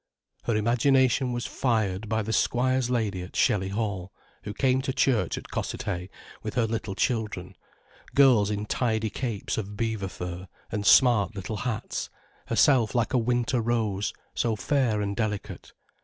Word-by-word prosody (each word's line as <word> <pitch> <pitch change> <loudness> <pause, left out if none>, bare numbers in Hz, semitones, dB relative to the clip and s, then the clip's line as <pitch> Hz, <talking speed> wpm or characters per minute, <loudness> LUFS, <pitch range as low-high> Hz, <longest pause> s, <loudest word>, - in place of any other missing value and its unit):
Her 115 - +1
imagination 125 +3 +3
was 120 0 -3
fired 110 -5 -1
by 110 -1 0
the 110 +2 -3
squire's 130 +1 +1
lady 110 -7 -1
at 90 - -9
Shelly 95 -2 +2
Hall, 100 -3 -3 0.3
who 105 - -3
came 130 +3 +1
to 130 - -2
church 130 -3 +1
at - - -9
Cossethay 90 +1 -3 0.3
with - - -5
her 120 - +3
little 110 -3 -3
children, 105 -6 -2 0.6
girls 125 -7 +6
in 105 0 -2
tidy 110 -1 0
capes 115 -4 -3
of 105 -1 -6
beaver 110 -3 -1
fur, 90 0 -6 0.2
and 105 -2 -2
smart 115 -5 +5
little 100 +2 -4
hats, 115 -1 -3 0.4
herself 125 -6 +3
like 120 0 +1
a 125 - +4
winter 120 +1 +1
rose, 110 -4 0 0.2
so 115 -2 0
fair 115 -2 +1
and 100 0 -2
delicate. 105 -2 -4
110 Hz, 155 wpm, -27 LUFS, 100-125 Hz, 0.6 s, girls